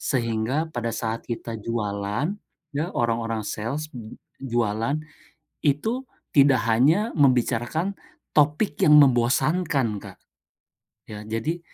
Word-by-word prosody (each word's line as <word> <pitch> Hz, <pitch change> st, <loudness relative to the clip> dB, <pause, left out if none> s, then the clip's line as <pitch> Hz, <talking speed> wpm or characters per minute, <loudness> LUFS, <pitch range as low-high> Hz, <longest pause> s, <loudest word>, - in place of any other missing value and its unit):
Sehingga 120 Hz, +4 st, 0 dB
pada 120 Hz, -3 st, -2 dB
saat 115 Hz, 0 st, -3 dB
kita 115 Hz, -1 st, -4 dB
jualan, 105 Hz, -, -2 dB, 0.4 s
ya 150 Hz, +4 st, -1 dB
orang-orang 115 Hz, -1 st, 0 dB
sales 140 Hz, +10 st, -4 dB
j 115 Hz, -3 st, -9 dB, 0.2 s
jualan, 120 Hz, +1 st, 0 dB, 0.7 s
itu 220 Hz, -, +1 dB, 0.3 s
tidak 135 Hz, -4 st, +5 dB
hanya 155 Hz, -, +3 dB
membicarakan 135 Hz, -, +2 dB, 0.4 s
topik 150 Hz, +4 st, +3 dB
yang 150 Hz, -, +6 dB
membosankan, 135 Hz, -, +2 dB
Kak. -, -, -11 dB, 0.9 s
Ya, 105 Hz, -1 st, -8 dB
jadi, 115 Hz, +10 st, -2 dB
125 Hz, 100 wpm, -24 LUFS, 115-150 Hz, 0.9 s, yang